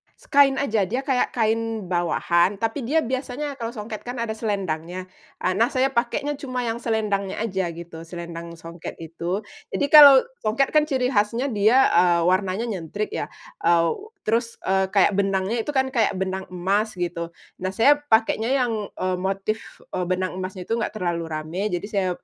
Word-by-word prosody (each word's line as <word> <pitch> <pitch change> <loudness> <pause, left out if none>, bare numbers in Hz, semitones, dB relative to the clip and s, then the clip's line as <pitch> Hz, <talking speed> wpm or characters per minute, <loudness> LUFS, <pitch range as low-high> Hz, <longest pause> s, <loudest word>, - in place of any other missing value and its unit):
Se - - -23
kain 275 -1 +6
aja, 220 -9 0
dia 250 +6 -2
kayak 260 -2 0
kain 225 -3 -1
bawahan 175 +2 +2
tapi 225 +4 -3
dia 320 +3 +2
biasanya 265 +2 -4
kalau 230 +1 -4
songket 215 0 -6
kan 245 - -4
ada 230 -2 -2
selendangnya. 185 -4 -3 0.3
A 185 - +2
nah, 225 +6 +3
saya 265 0 +1
pakainya 270 +4 -1
cuma 255 -3 -3
yang 230 0 -2
selendangnya 210 -4 -1
aja 190 -5 -1
gitu, 170 -1 -9
selendang 170 -1 -7
songket 165 +1 -9
itu. 170 +5 -4 0.3
Jadi 290 - +1
kalau 285 -3 +10 0.2
songket 230 +6 +1
kan 305 0 +3
ciri 260 -2 0
khasnya 230 +5 +1
dia, 220 +6 +4
eee, 175 0 +4
warnanya 185 +4 +1
nyentrik 205 -1 -4
ya, - - -3 0.3
aw 170 -1 +3 0.3
terus, 230 +2 0
eee, 190 0 +2
kayak 200 0 +4
benangnya 195 +3 0
itu 295 - -3
kan 265 0 +2
kayak 225 -6 +1
benang 190 0 -3
emas 195 +4 -1
gitu. 170 -1 -3 0.3
Nah, 185 - -1
saya 290 +6 +5
pakainya 225 -4 +2
yang, 225 -5 -1
eee, 185 -1 -1
motif, 195 +4 -3
eee, 180 - -1
benang 185 0 -2
emasnya 185 0 -5
tuh 230 +1 -1
nggak 215 - -3
terlalu 170 -4 -2
rame, 160 +6 -3
jadi 175 +2 -3
saya 195 -3 +1
210 Hz, 175 wpm, -23 LUFS, 185-235 Hz, 0.3 s, kalau